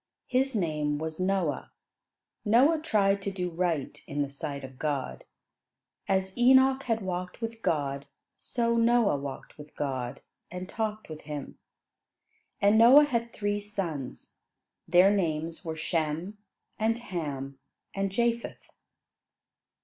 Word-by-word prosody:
His 260 0 +1
name 150 -6 0
was 160 +2 -5
Noah. 185 -6 0 0.7
Noah 265 +10 +4
tried 200 -9 +2
to 200 - -2
do 180 -2 -3
right 165 -5 -2
in 145 0 -1
the 140 - -6
sight 140 0 -5
of 130 -1 -10
God. 145 -4 -3 0.8
As 190 0 0
Enoch 260 +2 +5
had 225 -4 -1
walked 180 +1 -4
with 225 -1 -5
God, 140 -4 -1 0.3
so 235 -1 0
Noah 230 -5 +4
walked 140 +1 -8
with 150 0 -12
God, 130 -4 -3 0.3
and 180 +1 -6
talked 215 0 -3
with 155 -1 -8
him. 145 -2 -6 1.0
And 205 +2 +5
Noah 265 +6 +9
had 235 -4 -1
three 205 -1 -1
sons; 180 -10 -5 0.5
their 180 +3 +6
names 165 -3 -1
were 160 -2 -4
Shem, 165 +5 -2 0.4
and 225 +1 +2
Ham, 145 - -5 0.3
and 195 -1 -1
Japheth. 235 +2 -1
185 Hz, 125 wpm, -28 LUFS, 150-225 Hz, 1.0 s, Noah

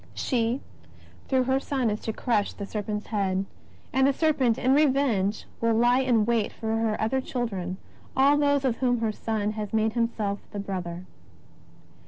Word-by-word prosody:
She 240 0 0 0.7
through 260 -1 +2
her 265 +1 +1
Son 265 -5 -1
is 210 - -2
to 225 - -3
crush 215 -2 0
the 200 - -6
serpent's 210 0 -4
head, 195 -3 -1 0.5
and 265 +1 +4
the 280 - +3
serpent 270 -6 +2
in 260 +1 +2
revenge 265 -9 +2
will 230 -1 +2
lie 240 +2 +4
in 245 -5 +3
wait 230 -2 +1
for 220 0 -3
her 225 -1 0
other 265 +5 +1
children, 195 -9 -3 0.4
all 275 +2 +6
those 285 -1 +2
of 240 -3 +1
whom 245 -3 +1
her 220 -1 +1
Son 215 -1 -2
has 210 -1 -5
made 220 0 +2
Himself 225 -4 -1
the 205 - -6
Brother. 180 -3 -5
225 Hz, 170 wpm, -26 LUFS, 210-260 Hz, 0.7 s, all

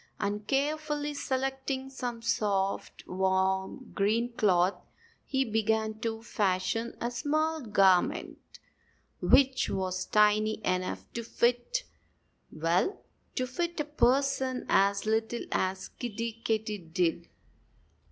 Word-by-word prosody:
And 205 +1 -2
carefully 295 +1 0
selecting 265 -1 -2
some 245 -3 -5
soft, 200 -4 -1
warm, 190 +5 0
green 225 +4 +1
cloth 185 -4 +2 0.4
he 270 -1 +1
began 220 -1 0
to 225 0 -3
fashion 210 +2 -1
a 235 - -2
small 310 +4 0
garment, 195 -6 +2 0.8
which 265 -1 +4
was 185 -1 -2
tiny 210 +1 +3
enough 185 0 -1
to 235 - -3
fit 245 - 0 0.7
well, 170 - +1 0.4
to 255 - 0
fit 340 +7 -3
a 300 - 0
person 265 -2 +1
as 200 +1 +3
little 220 +2 0
as 185 0 -1
Kiddie 230 -1 -5
Katydid. 190 -6 -1
225 Hz, 105 wpm, -29 LUFS, 195-265 Hz, 0.8 s, which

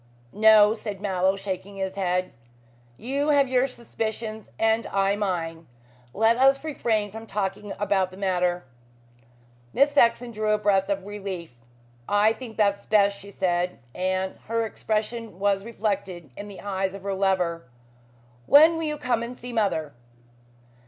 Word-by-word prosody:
"No," 215 0 +6
said 210 -3 -6
Mallow, 190 -1 +1
shaking 195 0 -5
his 190 -1 -3
head, 185 -1 -1 0.6
"you 280 +5 -1
have 285 -2 +4
your 255 +1 +2
suspicions 220 -3 -5
and 225 +1 +1
I 195 0 +1
mine. 170 -5 -3 0.4
Let 225 - +3
us 270 +2 +4
refrain 220 -9 -1
from 225 +2 -9
talking 200 0 -3
about 195 -2 +1
the 185 - -13
matter." 180 -2 0 1.1
Miss 280 +1 +4
Saxon 240 -3 +3
drew 215 -1 -2
a - - +3
breath 200 -2 +2
of 195 -1 -2
relief. 195 -6 -6 0.6
"I 205 +2 +4
think 225 -1 -10
that 200 -2 +2
is - - -21
best," 200 -1 +3
she 200 - -11
said, 180 -2 -1 0.2
and 185 +1 -2
her 230 +1 0
expression 220 -1 -3
was 195 0 +1
reflected 200 - -3
in 205 - -7
the 200 -2 -10
eyes 195 -1 -2
of 195 - -10
her 200 0 -2
lover. 180 -7 0 0.8
"When 320 +3 +7
will 325 - -3
you 300 -1 -2
come 250 -5 0
and 240 +1 -6
see 245 0 -8
mother?" 175 -10 0
205 Hz, 150 wpm, -25 LUFS, 190-225 Hz, 1.1 s, When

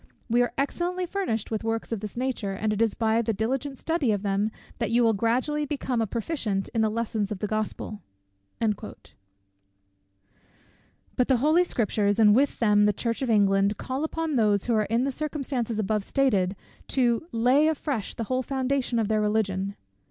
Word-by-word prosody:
We 240 +1 +4
are 245 - +1
excellently 350 +6 -1
furnished 345 - -2
with 220 -1 -2
works 225 +1 -2
of 225 - -1
this 210 +2 -7
nature; 245 -6 -2
and 215 +2 -1
it 210 - -2
is 225 -2 +2
by 225 0 +2
the 225 -1 -1
diligent 265 +6 -2
study 320 -7 0
of 205 -1 -1
them 200 +1 +1 0.3
that 230 -4 0
you 240 +1 +3
will 225 -1 +4
gradually 250 +8 0
become 265 -4 -1
a 225 - 0
proficient 220 -4 -2
in 225 - 0
the 220 - +3
lessons 220 -2 -2
of 210 - -2
the 200 - -3
Gospel." 215 0 -3 0.6
But 215 -1 -3 2.2
the 265 - +4
holy 310 +8 +4
Scriptures, 210 - 0
and 215 -2 +6
with 275 +3 +2
them 210 -2 +4
the 210 - +3
Church 230 +4 -2
of 260 - -1
England, 200 -1 +3
call 260 +3 -3
upon 315 -2 -1
those 210 -3 +2
who 240 - +1
are 215 -1 +2
in 230 +4 +1
the 275 - 0
circumstances 270 -6 -3
above 215 0 0
stated, 200 -8 +1 0.3
to 245 +3 +1
lay 250 +6 +4
afresh 285 -8 -2
the 230 - -3
whole 255 +3 -1
foundation 265 -1 -1
of 225 -2 +1
their 215 0 +1
Religion. 200 -2 0
230 Hz, 180 wpm, -26 LUFS, 210-265 Hz, 2.2 s, and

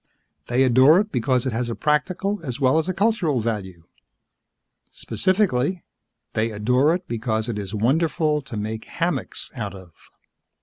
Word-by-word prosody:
They 125 +2 +2
adore 130 +6 +6
it 210 +1 -1
because 125 +1 +1
it 130 - -1
has 120 +1 -2
a 115 - -3
practical 185 +7 0
as 130 -3 -4
well 135 +3 +3
as 160 - -2
a - - 0
cultural 195 - +1
value. 100 -7 -4 1.1
Specifically, 185 -4 0 0.5
they 110 +1 0
adore 125 +9 +2
it 180 0 -7
because 110 -1 -2
it 110 -3 -3
is 100 +1 -5
wonderful 150 - +1
to 120 -5 -8
make 110 +1 -4
hammocks - - -3
out - - -5
of. 95 -3 -13
130 Hz, 150 wpm, -23 LUFS, 110-160 Hz, 1.1 s, adore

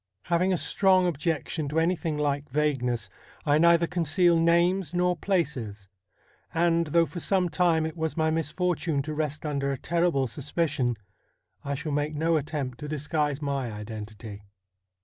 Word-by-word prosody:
Having 180 +2 +1
a 185 - +2
strong 185 +1 +3
objection 160 -2 -1
to 155 +3 +1
anything 165 -2 0
like 145 -1 -1
vagueness, 130 -4 0 0.4
I 150 0 +3
neither 170 0 +5
conceal 175 +1 +2
names 170 +1 +2
nor 180 0 +2
places; 130 - -2 0.7
and, 170 0 +2
though 165 +2 +3
for 175 - -7
some 185 0 +1
time 165 0 +2
it 160 - -4
was 160 0 -3
my 160 0 +2
misfortune 165 -1 -1
to 155 +2 -4
rest 150 0 -3
under 140 -2 -1
a 135 - -2
terrible 170 -3 +1
suspicion, 135 -2 -1 0.7
I 140 0 -2
shall 150 +2 -4
make 145 +1 -1
no 165 +2 +1
attempt 145 -4 -3
to 150 - -6
disguise 150 -1 -1
my 140 -4 -2
identity. 105 0 -8
155 Hz, 150 wpm, -27 LUFS, 140-170 Hz, 0.7 s, neither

